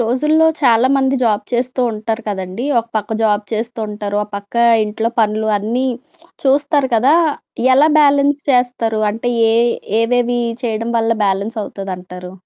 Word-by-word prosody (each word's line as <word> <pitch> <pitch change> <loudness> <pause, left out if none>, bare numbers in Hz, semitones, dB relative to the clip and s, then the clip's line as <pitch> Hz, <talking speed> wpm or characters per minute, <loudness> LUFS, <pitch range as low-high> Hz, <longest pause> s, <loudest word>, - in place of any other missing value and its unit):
రోజుల్లో 300 +7 +2
చాలా 240 -2 +4
మంది 270 0 +1
జాబ్ 215 -4 +1
చేస్తూ 250 +1 -1
ఉంటారు 220 +1 -4
కదండీ! 190 +3 -4
ఒక 230 - -2
పక్క 215 +1 -2
జాబ్ 210 -1 +2
చేస్తూ 230 +2 -4
ఉంటారు. 205 -1 -4
ఓపక్క 200 0 -8 0.3
ఇంట్లో 220 +2 -2
పనులు 215 0 0
అన్నీ 235 +6 -2 0.6
చూస్తారు 280 0 +2
కదా! 260 +7 +4 0.6
ఎలా 295 +4 +5
బ్యాలెన్స్ 285 0 +3
చేస్తరు? 245 -3 0
అంటే 230 +3 -3
యే 225 0 +3 0.5
ఏవేవి 245 +1 +1 0.2
చేయడం 230 0 -2
వల్ల 225 0 +1
బ్యాలెన్స్ 200 +4 -1
అవుతదంటారు? 180 -2 -8
230 Hz, 135 wpm, -17 LUFS, 210-255 Hz, 0.6 s, ఎలా